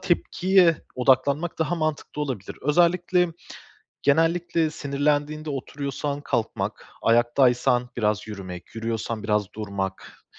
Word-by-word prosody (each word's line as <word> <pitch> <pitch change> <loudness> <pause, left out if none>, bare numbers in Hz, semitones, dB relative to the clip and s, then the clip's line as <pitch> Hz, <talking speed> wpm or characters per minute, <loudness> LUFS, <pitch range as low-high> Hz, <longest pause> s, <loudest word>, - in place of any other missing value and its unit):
tepkiye 180 -1 +3 0.2
odaklanmak 135 +6 +2
daha 165 +2 +1
mantıklı 155 -2 -2
olabilir. 125 -9 -5
Özellikle 175 +4 +3 0.7
genellikle 165 +2 +2
sinirlendiğinde 150 +1 -1
oturuyorsan 140 +1 -4
kalkmak, 115 -5 -2
ayaktaysan 120 +1 +3
biraz 105 -1 0
yürümek, 95 -4 -8
yürüyorsan 115 -1 -3
biraz 105 -2 0
durmak, 100 -3 -5
140 Hz, 90 wpm, -25 LUFS, 115-160 Hz, 0.7 s, tepkiye